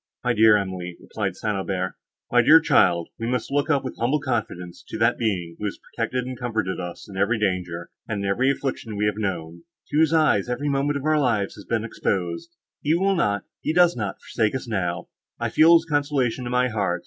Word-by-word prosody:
"My 125 0 +2
dear 110 -1 +6
Emily," 90 -3 -4
replied - - -4
St. 105 -1 -2
Aubert, 95 -1 -2 0.4
"my 120 - +5
dear 155 +7 +8
child, 85 - +3
we 115 - -2
must 125 +1 -2
look 145 +1 +1
up 145 -3 +2
with 130 - -6
humble 130 +6 +1
confidence 110 -10 -4
to - - -5
that 115 +2 +2
Being, 90 -7 -2
who 105 - -4
has 100 - -3
protected 125 +2 -3
and 130 0 -5
comforted 110 -6 -2
us 90 -1 -7
in 95 - -9
every 105 +4 +2
danger, 90 -4 -2 0.2
and 100 -2 -3
in - - -1
every 120 +7 +2
affliction 130 -5 -3
we 105 +1 0
have 105 0 0
known; 85 -5 -3 0.3
to 145 - 0
whose 160 -1 +4
eye 155 -10 +4
every 140 +4 -1
moment 140 +1 0
of 140 - -6
our 155 0 +3
lives 115 -8 +1
has 100 - -12
been 115 -2 -1
exposed; 95 - -2 0.3
he 155 +3 +2
will 195 +3 +2
not, 105 - 0 0.2
he 155 - -1
does 175 0 +5
not, 100 -4 -3
forsake 110 0 -1
us 130 - -4
now; 95 -6 -2 0.3
I - - -1
feel 160 +2 +6
his 165 -1 +3
consolations 140 -5 0
in - - -4
my 125 0 +2
heart. 100 -6 -1
115 Hz, 220 wpm, -24 LUFS, 95-135 Hz, 0.4 s, dear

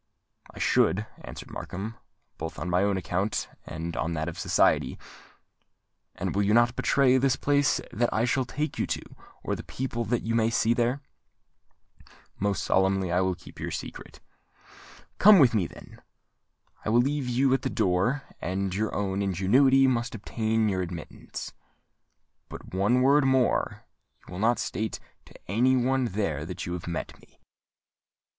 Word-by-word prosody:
"I - - -15
should," 105 +3 +2 0.2
answered - - -9
Markham; 105 +5 -6 0.4
"both 80 +1 -5
on 90 - -4
my 90 +1 +3
own 100 -1 +1
account 95 +4 -1 0.2
and 80 +1 -5
on 85 - -1
that 80 0 -2
of 85 - -6
society." - - +2 1.2
"And - - -3
you 100 - +2
will 105 +2 +3
not 120 0 +4
betray 130 -2 +3
the 130 0 +2
place 145 0 +2
that 120 +2 +1
I 110 - +1
shall 130 +2 +1
take 150 +5 -4
you - - 0
to, - - -2 0.4
or - - -1
the - - -6
people 125 -2 -4
that 120 +3 -1
you 115 - -2
may 115 -1 +3
see 115 0 +2
there?" 120 +4 0 1.4
"Most 100 -2 0
solemnly 95 -1 +2
will 90 +2 +2
I - - -13
keep - - -14
your - - -3
secret." - - -7 1.0
"Come 210 0 +9
with 130 -8 +6
me, 100 -6 +1
then. - - -14 0.8
I - - -2
will 120 +2 +5
leave 140 0 -1
you 130 +2 +2
at 135 - +1
the 130 - -2
door; 100 +7 +1 0.2
and 95 +1 -2
your 110 +3 -1
own 100 -1 -1
ingenuity 120 +9 +4
must 120 -2 0
obtain 110 +1 0
you 95 -3 0
admittance. 85 -3 -7 1.0
But, - - -10
one 105 +7 +2
word 140 +2 +5
more: 130 -2 +1 0.4
you - - -12
will 90 - -6
not 115 +3 +3
state 110 0 -3 0.3
to - - -18
any 125 +7 +3
one 130 +1 +1
there 95 -9 -2
that 90 +1 -5
you 90 - -4
have 90 -1 -6
met 85 - -5
me?" - - -24
110 Hz, 165 wpm, -27 LUFS, 95-125 Hz, 1.4 s, Come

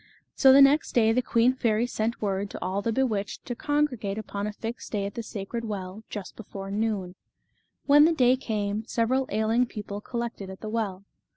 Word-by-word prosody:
So 265 - +6
the 275 +1 +9
next 285 +3 +3
day 225 -2 +4
the 250 +3 +2
queen 240 +1 +3
fairy 230 -3 +1
sent 230 -1 -2
word 200 0 -1
to - - -7
all 190 +2 -2
the 230 - -1
bewitched 220 -5 -1
to 245 - -3
congregate 255 -9 -1
upon 205 -1 -4
a - - -3
fixed 225 +3 -7
day 200 -2 0
at 200 - -5
the 235 - -4
sacred 220 +1 -5
well, 205 -1 -5
just 205 -3 -7
before 195 -2 -8
noon. 205 -4 -1 0.7
When 295 +1 +7
the 330 - +4
day 255 -5 +4
came, 215 -4 -2
several 255 +3 +1
ailing 220 +4 +1
people 205 -2 -6
collected 235 -4 -5
at 190 - -10
the 215 - -5
well. 205 -4 -2
220 Hz, 195 wpm, -27 LUFS, 200-245 Hz, 0.7 s, the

